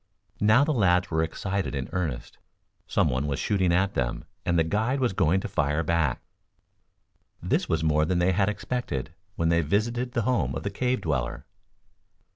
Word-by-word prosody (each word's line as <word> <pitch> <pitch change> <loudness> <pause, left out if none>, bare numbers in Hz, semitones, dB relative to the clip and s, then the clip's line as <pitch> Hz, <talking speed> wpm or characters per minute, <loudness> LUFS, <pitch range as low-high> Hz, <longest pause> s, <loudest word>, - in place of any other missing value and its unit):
Now 110 +6 +5
the 155 +1 +1
lads 90 -5 +2
were 80 0 +1
excited 95 +2 -2
in 65 -1 -3
earnest. 80 -10 -4 0.5
Some - - +2
one 65 +3 -1
was 70 - -1
shooting 95 -4 +1
at 95 +3 +2
them, - - -2 0.2
and 85 - +2
the 80 - +4
guide 110 +10 0
was 125 -6 +1
going 95 0 +2
to - - -4
fire 75 +2 0
back. 80 -5 0 1.2
This - - -1
was 80 -1 0
more 75 -1 +3
than 90 +2 0
they 90 +2 +3
had 95 +2 +2
expected 105 - -3 0.2
when 80 0 +1
they 85 0 +3
visited 120 - -1
the 120 - 0
home 125 +3 0
of - - -4
the 100 - -2
cave 125 +5 -1
dweller. 70 -7 -2
90 Hz, 180 wpm, -26 LUFS, 80-105 Hz, 1.2 s, Now